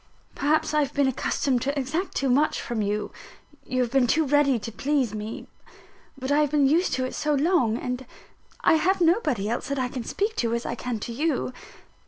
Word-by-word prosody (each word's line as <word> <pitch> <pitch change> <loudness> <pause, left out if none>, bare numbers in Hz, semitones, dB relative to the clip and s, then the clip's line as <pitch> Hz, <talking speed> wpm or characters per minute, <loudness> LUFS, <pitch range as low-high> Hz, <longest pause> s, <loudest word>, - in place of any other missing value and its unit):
Perhaps 300 +2 +1
I 300 - +3
have 285 -1 -1
been 280 -1 +3
accustomed 260 0 0
to 280 +3 -1
exact 315 +8 -3
too 275 - 0
much 290 +5 +2
from 235 -2 -3
you 210 +1 -2 0.6
you 255 0 +1
have 235 - -4
been 265 -2 +3
too 315 +6 +2
ready 285 -2 +3
to 230 +1 -6
please 265 -1 0
me. 215 +1 -6 0.7
But 260 +1 -4
I 290 - +4
have 300 -1 +2
been 290 -1 +3
used 335 +6 +2
to 255 0 0
it 255 - -5
so 300 -1 0
long; 285 -7 +2
and 250 0 -4 0.5
I 320 - +5
have 370 +4 +2
nobody 325 - +2
else 235 +3 -2
that 280 0 -2
I 255 -1 -1
can 250 -2 -5
speak 420 - -2
to 230 -1 0
as 235 - -3
I - - -2
can 240 -1 -3
to 235 - -5
you. 280 -1 -1
270 Hz, 215 wpm, -25 LUFS, 245-300 Hz, 0.7 s, I